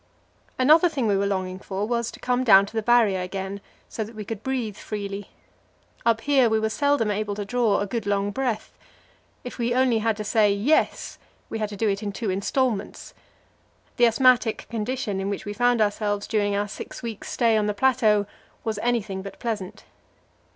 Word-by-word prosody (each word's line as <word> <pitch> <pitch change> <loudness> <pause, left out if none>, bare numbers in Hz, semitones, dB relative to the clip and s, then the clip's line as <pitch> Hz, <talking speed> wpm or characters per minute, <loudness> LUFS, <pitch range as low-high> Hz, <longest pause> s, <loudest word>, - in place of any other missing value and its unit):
Another 310 +7 +5
thing 275 -7 -2
we 205 -2 +2
were 200 +1 +1
longing 185 -1 -2
for 195 +1 -3
was 235 -1 -1
to - - -11
come 250 0 0
down 200 -5 +7
to 200 - -13
the 220 - 0
Barrier 220 -5 +3
again, 190 +2 -5 0.3
so 220 - -4
that 220 +2 -11
we 210 -1 -6
could 220 0 -5
breathe 245 -6 -2
freely. 200 -1 -6 0.8
Up 225 -1 +3
here 270 -5 +3
we 220 0 +2
were 220 0 -1
seldom 285 -5 +1
able 205 0 -2
to 205 0 -4
draw 230 -1 +1
a 205 - -1
good 220 +1 -4
long 200 0 0
breath; 245 -2 -3 0.7
if 245 - -8
we 240 +1 0
only 255 -3 +3
had 220 -1 0
to 215 - -4
say 210 -1 +3
"Yes," 215 +10 0 0.3
we 225 - -3
had 215 -1 -2
to 205 - -8
do 220 - +1
it 195 -1 0
in 205 -1 -3
two 200 0 -3
instalments. 210 +2 -2 0.8
The 240 -1 +6
asthmatic 245 -1 +3
condition 225 -2 -2
in 195 +1 -2
which 200 - -4
we 205 - -4
found 245 +1 +2
ourselves 205 -1 0
during 205 -2 0
our 205 +1 0
six 205 - -8
weeks' 225 -3 -6
stay 230 -3 +2
on 210 -1 +1
the 210 - -1
plateau 220 -4 +3 0.4
was 220 -2 -2
anything 215 -5 -1
but 195 0 -9
pleasant. 215 -5 -5
215 Hz, 195 wpm, -24 LUFS, 200-240 Hz, 0.8 s, down